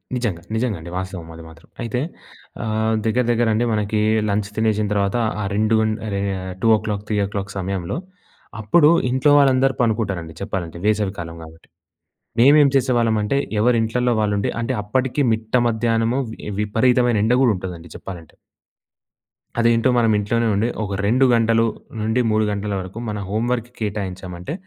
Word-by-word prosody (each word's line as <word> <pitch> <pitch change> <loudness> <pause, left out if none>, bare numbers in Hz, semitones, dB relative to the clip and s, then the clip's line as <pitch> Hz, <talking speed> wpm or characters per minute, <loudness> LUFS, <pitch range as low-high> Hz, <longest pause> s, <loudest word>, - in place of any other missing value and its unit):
నిజంగా. 110 -9 -2
నిజంగా 110 -3 -1
అండి. 85 +2 -9
వాస్తవం 95 -3 -6
అది 80 - -10
మాత్రం. 80 0 -17
అయితే 120 +1 -2 0.6
ఆహ్, 110 0 0
దగ్గర, 120 +3 +2
దగ్గర 120 0 +2
అండి 115 +3 +1
మనకి 105 0 0 0.3
లంచ్ 100 0 -1
తినేసిన 110 -1 +1
తర్వాత 100 +2 0 0.2
ఆ - - -2
రెండు 110 +2 +2
గం 110 0 +1 0.2
అహ్, 100 -2 -3
2:00 105 -2 +2
3:00 100 -1 -2
సమయంలో 95 - -3 0.6
అప్పుడు 150 +9 +5 0.2
ఇంట్లో 130 +3 +3
వాళ్ళందరూ 135 -1 +3
పండుకుంటారండి 100 -8 -1
చెప్పాలంటే 90 -4 -4
వేసవి 105 -2 +1
కాలం 85 -1 -6
కాబట్టి. 80 0 -15 0.7
మేము 140 +5 +7
ఏం 140 - +5
చేసేవాళ్ళం 120 -4 +2
అంటే 105 +7 0 0.2
ఎవరి 120 +2 +3
ఇంట్లల్లో 125 +2 0
వాళ్ళు 105 -1 +1
ఉండి 100 - 0
అంటే 115 - -1
అప్పటికి 130 +6 0
మిట్ట 110 +1 -4
మధ్యాహ్నము 115 +1 +1 0.4
విపరీతమైన 120 +3 +2
ఎండగూడ 125 +2 +3
ఉంటదండి 90 -2 -7
చెప్పాలంటే. 85 -5 -10 1.3
అదేంటో 115 +1 +3
మనం 115 -2 +3
ఇంట్లోనే 115 +3 0
ఉండి 105 +3 +1 0.2
ఒక 100 -1 -4
2 125 +6 +3
గంటలు 115 0 +3 0.3
నుండి 110 +3 +1
3 110 0 +2
గంటల 100 0 -3
వరకు 95 +3 -8
మన 105 - -3
హోమ్ 110 +4 -1
వర్క్‌కి 120 -1 -2
కేటాయించామంటే 95 -2 -5
110 Hz, 150 wpm, -21 LUFS, 100-120 Hz, 1.3 s, మేము